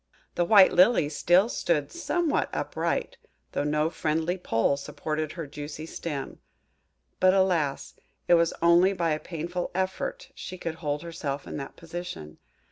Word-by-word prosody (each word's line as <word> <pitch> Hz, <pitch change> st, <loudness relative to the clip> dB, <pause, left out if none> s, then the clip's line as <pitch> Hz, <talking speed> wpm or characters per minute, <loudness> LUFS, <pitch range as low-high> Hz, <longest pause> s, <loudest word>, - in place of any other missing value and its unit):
The 175 Hz, -, +1 dB
white 195 Hz, 0 st, +7 dB
Lily 180 Hz, -4 st, +5 dB
still 175 Hz, +7 st, +3 dB
stood 160 Hz, -10 st, -1 dB
somewhat 345 Hz, -1 st, 0 dB
upright, -, -, -2 dB, 0.3 s
though -, -, -1 dB
no 150 Hz, +2 st, +1 dB
friendly 160 Hz, +2 st, -1 dB
pole 140 Hz, -7 st, +1 dB
supported 150 Hz, +2 st, -4 dB
her 165 Hz, -2 st, -5 dB
juicy 145 Hz, +2 st, -7 dB
stem; 150 Hz, -4 st, -5 dB, 0.8 s
but, 185 Hz, +1 st, +5 dB
alas! 170 Hz, -8 st, +1 dB, 0.3 s
it -, -, +5 dB
was 170 Hz, -1 st, +4 dB
only 175 Hz, +3 st, +5 dB
by 170 Hz, -3 st, 0 dB
a 155 Hz, -, 0 dB
painful 175 Hz, +2 st, -4 dB
effort 190 Hz, 0 st, -3 dB
she 185 Hz, -, -8 dB
could 165 Hz, -2 st, -4 dB
hold 150 Hz, -1 st, -2 dB
herself 145 Hz, -4 st, -4 dB
in -, -, -6 dB
that 135 Hz, -1 st, -7 dB
position. 165 Hz, -, -8 dB
165 Hz, 145 wpm, -27 LUFS, 150-180 Hz, 0.8 s, white